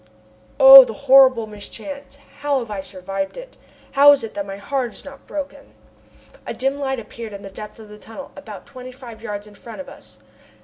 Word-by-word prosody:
Oh! 270 0 +11
the 225 -3 -7
horrible 265 -4 +5
mischance! 225 +7 -10 0.2
How 285 -1 0
have 235 -4 -5
I 200 -2 -4
survived 195 0 -6
it? - - -11 0.4
How 285 +1 +7
is 275 - -2
it 225 - -7
that 200 -1 -5
my 195 0 -7
heart 250 +3 -3
is - - -15
not 275 -1 -13
broken? 285 -2 -8 0.7
A - - -5
dim 270 +2 -2
light 265 -1 -2
appeared 225 0 -10
in 200 0 -9
the 195 - -10
depth 210 +2 -10
of 220 -1 -13
the 210 0 -13
tunnel, 225 +6 -11
about 215 -9 -11
twenty 255 0 -11
five 245 -3 -13
yards 205 -2 -6
in 210 - -16
front 215 0 -12
of 190 - -8
us. 110 0 -13
230 Hz, 205 wpm, -20 LUFS, 205-275 Hz, 0.7 s, Oh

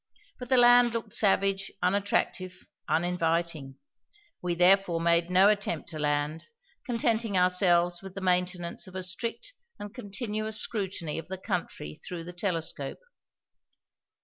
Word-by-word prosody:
But 250 -1 -8
the 260 - +4
land 245 -1 +6
looked 230 - -4
savage, 195 -1 +2
unattractive, 185 -1 -1 0.2
uninviting. 165 -4 -1 0.7
We 175 -1 -1
therefore 180 -1 +4
made 170 +1 +2
no 185 +2 +6
attempt 205 -6 0
to 155 - -7
land, 150 +1 -1 0.4
contenting 230 -3 0
ourselves 175 -1 +3
with 195 -1 -10
the - - -4
maintenance 180 -1 -1
of 185 - -13
a 185 - -2
strict 230 - -4 0.2
and 205 0 -8
continuous 215 -1 -3
scrutiny 190 -8 -2
of 165 - -9
the 190 +1 -5
country 75 - -4
through 175 -2 -6
the 175 +1 -9
telescope. 175 - -3
185 Hz, 130 wpm, -28 LUFS, 170-205 Hz, 0.7 s, land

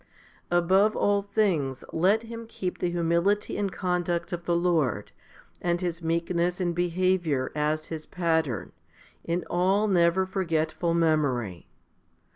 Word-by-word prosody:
5 175 - +3
Above 195 +5 +3
all 205 0 +2
things 180 - 0
let 195 +7 +3
him 230 0 -8
keep 185 -5 -4
the 175 - 0
humility 175 +4 +1
and 200 -2 -1
conduct 175 -1 -1
of 170 0 -5
the 170 - +1
Lord, 165 - 0 0.5
and 175 0 0
His 175 -2 -3
meekness 170 +2 0
and 175 -2 0
behaviour, 175 -5 0
as 150 +1 -1
his 155 -2 -6
pattern, 160 - -1 0.5
in 170 +1 -1
all 190 +4 +2
never 180 -1 +3
forgetful 165 -3 -1
memory. 140 - 0
175 Hz, 130 wpm, -27 LUFS, 160-185 Hz, 0.5 s, 5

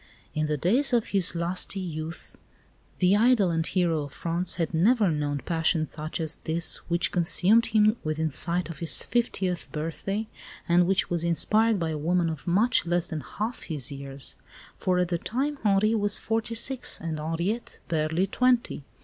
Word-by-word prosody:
In 155 0 -1
the 150 0 -1
days 245 - +2
of 235 -2 +1
his 190 -3 +2
lusty 175 +3 -2
youth 165 -2 -6 0.6
the 185 +2 +4
idol 215 -4 +4
and 165 -1 0
hero 170 -3 0
of 140 - -12
France 170 +1 -2
had 165 -1 -2
never 205 +3 +3
known 145 -2 -2
passion 160 -1 +1
such 155 +1 -6
as 160 -1 0
this 165 +1 +1
which 170 0 +2
consumed 190 +6 +4
him 215 0 +3
within 155 0 -1
sight 170 +4 -1
of 165 -4 -8
his 165 - +2
fiftieth 190 -7 -2
birthday, 185 +7 -3 0.4
and 175 0 +4
which 195 -1 +1
was 170 -1 0
inspired 215 +7 +2
by 165 -3 -2
a 155 - -3
woman 170 +2 +1
of 155 +2 -8
much 210 +3 +3
less 175 0 0
than 155 -2 -4
half 220 +9 -5
his 145 -7 -3
years; 140 -1 -5 0.4
for 185 -1 0
at 180 -1 +1
the 170 -1 -1
time 275 - -2
Henri 210 +1 +3
was 205 -2 +1
forty 225 +1 -2
six, 255 +2 -1
and 160 -2 -4
Henriette 170 +9 -3
was - - -32
barely 160 +3 +1
twenty. 245 - +1
175 Hz, 175 wpm, -26 LUFS, 160-210 Hz, 0.6 s, the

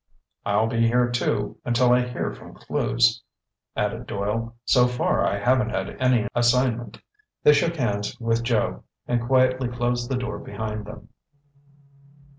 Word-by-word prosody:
"I'll 105 +2 +2
be 115 0 +1
here, 120 +1 +2
too, 105 -4 -1
until 120 +1 +3
I 125 0 +2
hear 125 - -3
from - - -13
Clewes," 115 0 +1 0.5
added 110 +4 -2
Doyle. 115 +3 -3
"So 125 -2 +4
far 125 0 0
I 100 - +1
haven't 125 +3 +2
had 95 0 -3
any 125 -3 +3
assignment." 120 0 +1 0.5
They 150 - +7
shook 165 +4 +1
hands 105 -3 -2
with 115 -1 0
Joe, 115 -2 0 0.2
and 120 -1 +1
quietly 130 +1 +2
closed 120 0 -2
the 130 - 0
door 105 -5 -4
behind 105 0 -5
them. 105 - -11
120 Hz, 145 wpm, -24 LUFS, 110-125 Hz, 0.5 s, They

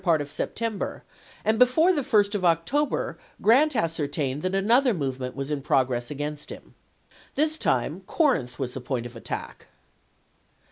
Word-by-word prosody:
part 170 -4 +3
of 145 -1 -5
September, 225 +5 -3 0.4
and 220 +1 +2
before 315 +9 +5
the 300 - 0
1st 205 -5 +2
of 200 -3 -1
October 175 - +1 0.2
Grant 270 +7 +4
ascertained 150 - -1
that 185 +2 -1
another 235 +5 +3
movement 130 -4 -3
was 135 +1 -4
in 145 -2 -1
progress 125 -2 +1
against 150 0 -5
him. - - -10 0.6
This 310 +2 +2
time - - 0
Corinth 245 - +1
was 125 -2 -3
the 130 - -5
point 125 -1 -3
of 120 0 -9
attack. 115 - -7
165 Hz, 150 wpm, -26 LUFS, -, 0.6 s, before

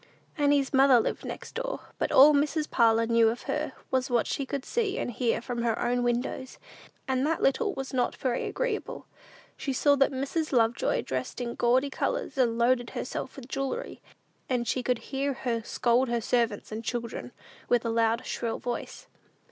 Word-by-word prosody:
Annie's 285 -2 +2
mother 265 -2 +6
lived - - -2
next - - -7
door, - - -3 0.2
but - - 0
all 290 +3 +8
Mrs. 300 +2 +1
Parlin 230 -1 +3
knew 230 -1 +5
of 235 +2 -4
her, 300 0 -2 0.2
was 260 +1 +1
what 240 -2 +2
she 275 - -3
could 275 -1 -4
see 425 -4 -1
and - - -2
hear 235 0 0
from 240 -1 -3
her 230 -2 0
own 245 0 0
windows; 245 +2 -2 0.5
and 260 -1 +1
that 325 - -1
little 270 - +2
was 270 0 -5
not 250 -1 0
very 250 -2 -1
agreeable. - - -3 0.5
She 275 - -3
saw 285 +2 +4
that 275 - +4
Mrs. 280 +4 -2
Love 230 -3 +4
joy - - 0
dressed 130 - -4
in 240 -1 -3
gaudy 255 +4 +2
colors, - - -2
and 240 -4 +2
loaded 240 0 +2
herself 260 - -5
with 265 -3 -10
jewelry; 275 - -4 0.5
and 245 -2 0
she 255 - 0
could 250 0 0 0.2
hear 275 +1 0
her 240 -3 -2
scold 240 +3 +1
her 235 0 +1
servants 230 -2 0
and 220 +1 -5
children 235 0 -4 0.4
with 245 -1 +2
a - - 0
loud, 230 +1 +1
shrill 230 -1 -2
voice. 240 -1 -5
255 Hz, 185 wpm, -28 LUFS, 235-275 Hz, 0.5 s, all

